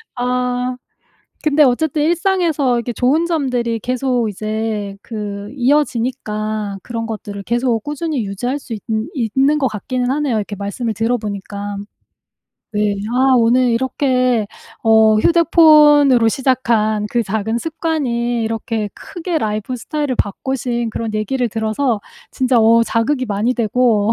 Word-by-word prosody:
아. 250 0 -1 0.7
근데 305 0 +3
어쨌든 295 +3 +1
일상에서 335 -6 +1
이렇게 235 0 -2
좋은 275 +8 +2
점들이 250 -8 -1
계속 250 -1 -1
이제 215 0 -3
그 205 -2 -6
이어지니까 225 -6 -1
그런 230 -1 -4
것들을 205 -2 -6
계속 235 0 0
꾸준히 295 -4 -2
유지할 245 +8 -3
수 235 - -8
있느 220 0 -1
있는 270 +4 +1
것 275 -3 +1
같기는 250 +3 -3
하네요, 275 -5 0
이렇게 205 0 -3
말씀을 205 +4 -3
들어 225 +3 0
보니까. 205 -1 -5 1.0
네. 210 -1 +1 0.2
아 260 +1 +4
오늘 245 +2 +3
이렇게 250 -1 +1 0.4
어 220 -1 +5
휴대폰으로 300 -5 +5
시작한 225 -4 +1
그 240 -1 +1
작은 220 +2 -2
습관이 245 -6 -1
이렇게 225 -1 -2
크게 345 -1 -5
라이프 215 -1 -2
스타일을 290 +2 -3
바꾸신 240 +2 -2
그런 225 0 -4
얘기를 240 +4 -1
들어서 220 +2 -1 0.3
진짜 255 -1 +2
어 230 +1 +5
자극이 255 +4 0
많이 215 +3 0
되고 230 -2 +2
240 Hz, 295 characters per minute, -18 LUFS, 220-265 Hz, 1.0 s, 어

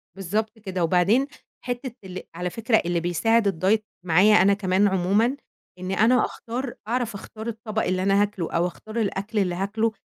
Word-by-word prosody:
بالضبط 215 +4 -2
كده، 190 -4 -3
وبعدين 185 +10 +3 0.4
حتّة 245 +1 -3
ال 185 -1 -7
على 180 +1 -2
فكرة 230 +3 +1
اللي 175 -1 0
بيساعد 205 +6 +2 0.2
الdiet 215 +3 +4 0.2
معايا 185 +5 +5
أنا 200 +2 +5
كمان 195 0 +2
عمومًا، 200 +8 +2 0.4
إن 185 +1 -4
أنا 225 +6 +4
أختار 240 +2 -5
أعرف 235 -2 -1
أختار 220 +3 -8
الطَبَق 220 -1 -3
اللي 185 0 0
أنا 195 +1 +3
هاكله 200 -5 -2
أو 170 +1 +1
أختار 215 +5 -9
الأكل 210 0 -1
اللي 180 -3 0
هاكله 215 +4 0
205 Hz, 165 wpm, -24 LUFS, 185-225 Hz, 0.4 s, معايا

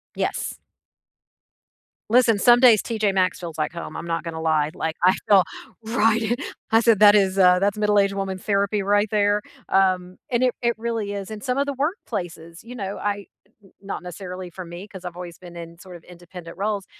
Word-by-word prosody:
Yes. - - -3 1.5
Listen, 235 -2 +4
some 240 +4 +6
days 235 -5 +6
TJ 215 -4 -1
Maxx 185 -1 +1
feels 165 -3 -7
like 155 +2 -2
home, 170 - -7
I'm - - -6
not 165 -1 -2
gonna 165 -1 -6
lie. 155 -2 +1
Like, 160 0 -3
I 185 +1 +6
feel 195 -3 +6 0.4
right 225 0 +2
at 245 - -5 0.3
I 225 - +6
said 225 -3 +4
that 210 -1 +8
is 195 -2 +2
uh, 180 -1 +6
that's 200 +2 0
middle-aged 205 -1 +2
woman 195 -1 -3
therapy 200 +1 0
right 205 +2 +2
there, 205 0 +2 0.3
um, 185 -1 +1
and 245 0 +1
it 250 -1 +2
it 235 -1 +1
really 225 -3 -3
is, 200 +1 -6
and 210 -1 -7
some 255 -1 -1
of 280 - +1
the 280 - -3
workplaces. 195 - -4
You 245 +2 -10
know, 200 -4 -5
I 205 -1 -3 0.4
n 195 - -20
not 195 -2 -6
necessarily 180 0 -7
for 185 +2 -8
me 175 +4 -9
'cause 190 -3 -11
I've 175 -1 -6
always 175 -1 -8
been 175 -1 -12
in 170 0 -10
sort 180 -1 -12
of 170 - -13
independent 175 -1 -12
roles, 200 0 -2
195 Hz, 200 wpm, -23 LUFS, 180-215 Hz, 1.5 s, that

